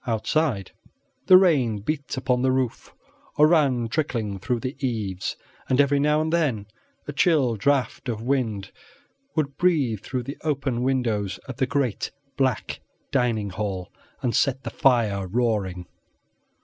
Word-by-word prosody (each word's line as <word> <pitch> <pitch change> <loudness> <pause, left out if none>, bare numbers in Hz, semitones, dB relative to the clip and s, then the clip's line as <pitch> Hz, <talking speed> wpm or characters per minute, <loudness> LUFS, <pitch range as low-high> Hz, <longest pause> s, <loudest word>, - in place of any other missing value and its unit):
Outside, 115 - 0 0.6
the 185 - +10
rain 140 - +3
beat 140 +4 -3
upon 125 -1 +1
the 130 0 +3
roof 130 -2 -2 0.5
or 150 - +7
ran 140 -8 +3
trickling 115 -8 -2
from 120 +3 -2
the 130 +1 -4
eaves, 105 -7 -2 0.3
and 130 - +2
every 140 0 +4
now 150 +2 +3
and 160 +1 -1
then 135 -12 +1 0.4
a 145 - -4
chill 145 -5 +3
draught 130 +2 0
of 110 -3 -2
wind 115 -6 -1 0.6
would 145 -3 -1
breathe 145 - +2
through 125 +1 -3
the 140 +5 -7
open 135 -5 -1
windows 115 -7 0
of 130 -3 -7
the 130 -2 +1
great 135 -7 -1 0.3
black 130 -5 -1 0.3
dining 115 -6 0
hall 95 -3 -4 0.3
and 120 -2 0
set 135 -2 +1
the - - -5
fire 110 -8 +2
roaring. 100 -5 -1
125 Hz, 145 wpm, -24 LUFS, 110-140 Hz, 0.6 s, the